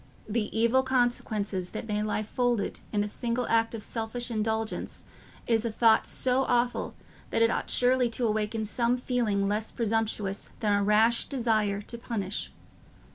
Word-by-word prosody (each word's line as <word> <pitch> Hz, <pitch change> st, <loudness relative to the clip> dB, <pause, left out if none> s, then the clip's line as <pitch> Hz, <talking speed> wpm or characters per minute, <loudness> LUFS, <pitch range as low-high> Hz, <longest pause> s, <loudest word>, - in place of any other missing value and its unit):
The 215 Hz, 0 st, -1 dB
evil 235 Hz, +3 st, +4 dB
consequences 225 Hz, -7 st, 0 dB
that 215 Hz, -, -6 dB
may 210 Hz, -1 st, -1 dB
lie 215 Hz, 0 st, -1 dB
folded 240 Hz, -1 st, -1 dB
in 205 Hz, -1 st, +1 dB
a -, -, -2 dB
single 235 Hz, +3 st, -2 dB
act 230 Hz, 0 st, +2 dB
of 215 Hz, -, -6 dB
selfish 235 Hz, +1 st, -2 dB
indulgence 220 Hz, 0 st, -2 dB, 0.4 s
is 225 Hz, -2 st, +2 dB
a 230 Hz, -, -1 dB
thought 220 Hz, 0 st, +4 dB
so 260 Hz, +1 st, +2 dB
awful 245 Hz, 0 st, 0 dB, 0.3 s
that 230 Hz, -, +2 dB
it 230 Hz, -, +4 dB
ought -, -, -2 dB
surely 250 Hz, 0 st, +3 dB
to 235 Hz, +1 st, 0 dB
awaken 215 Hz, 0 st, -1 dB
some 235 Hz, +3 st, +1 dB
feeling 230 Hz, -6 st, 0 dB
less 210 Hz, +2 st, -1 dB
presumptuous 220 Hz, -3 st, -2 dB
than 210 Hz, -3 st, +1 dB
a 200 Hz, 0 st, +2 dB
rash 220 Hz, +3 st, +3 dB
desire 215 Hz, -6 st, 0 dB
to 235 Hz, +2 st, -8 dB
punish. 210 Hz, -4 st, -4 dB
225 Hz, 160 wpm, -28 LUFS, 210-240 Hz, 0.4 s, evil